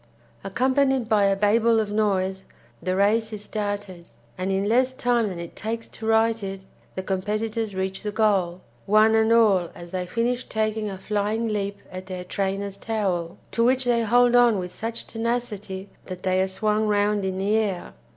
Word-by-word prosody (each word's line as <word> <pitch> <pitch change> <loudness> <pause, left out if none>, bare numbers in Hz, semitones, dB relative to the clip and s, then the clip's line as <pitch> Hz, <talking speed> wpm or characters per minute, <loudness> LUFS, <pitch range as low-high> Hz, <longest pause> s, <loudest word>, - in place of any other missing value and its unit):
Accompanied 260 +4 +1
by 210 -3 +3
a 195 0 +3
babel 220 +3 +3
of 210 -2 -1
noise, 190 -3 0 0.4
the 185 +2 -1
race 215 +3 +2
is 210 -1 -6
started, 205 -5 -4 0.3
and 185 +1 -2
in 195 +1 0
less 255 +3 +2
time 240 -3 +1
than 185 - -6
it 170 0 -8
takes 225 +1 -4
to 220 - -8
write 225 0 +3
it 195 -1 -6 0.3
the 190 - -3
competitors 210 +3 -2
reach 190 0 -3
the 210 - -3
goal, 195 -5 +1 0.3
one 215 +2 +5
and 220 0 +3
all 205 -7 +4
as 175 0 -10
they 180 -1 -3
finish 240 +4 -1
taking 215 -1 -1
a 195 - -6
flying 210 +3 -1
leap 200 -1 -2
at 185 0 -8
their 185 -1 -5
trainer's 195 +1 -3
towel, 185 -6 -2
to 230 - +1
which 255 +2 +3
they 240 -1 +2
hold 245 +2 +4
on 240 -3 +5
with 180 -1 -4
such 225 +4 -4
tenacity 225 -4 -3 0.2
that 185 -1 -8
they 185 0 +2
are 190 - +1
swung 215 +2 0
round 205 0 +2
in 190 -1 -2
the 195 +2 0
air. 205 -5 -1
210 Hz, 180 wpm, -24 LUFS, 190-225 Hz, 0.4 s, one